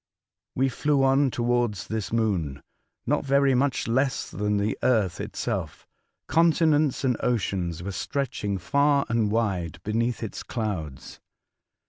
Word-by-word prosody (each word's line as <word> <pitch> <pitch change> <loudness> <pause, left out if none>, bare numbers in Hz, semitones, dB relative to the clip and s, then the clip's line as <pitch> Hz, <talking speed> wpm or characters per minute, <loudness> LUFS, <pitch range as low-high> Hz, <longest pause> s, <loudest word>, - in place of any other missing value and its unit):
We 135 +1 +2
flew 140 +2 +1
on 135 +1 +4
towards 120 -4 0
this 110 -2 -4
moon, 90 -12 -1 0.4
not - - +1
so - - -11
very 140 0 +4
much 135 +2 +1
less 130 +3 0
than 105 0 0
the 100 +1 0
earth 110 -8 +1
itself. - - -4 0.4
Continents 155 -4 +3
and 125 -4 +1
oceans 90 -8 -1
were 100 - -4
stretching 105 -4 -2
far 140 +9 +2
and 115 -2 +1
wide 100 -7 -1
beneath 115 +3 -1
its 110 - -5
clouds. 95 - -5
115 Hz, 130 wpm, -26 LUFS, 100-135 Hz, 0.4 s, on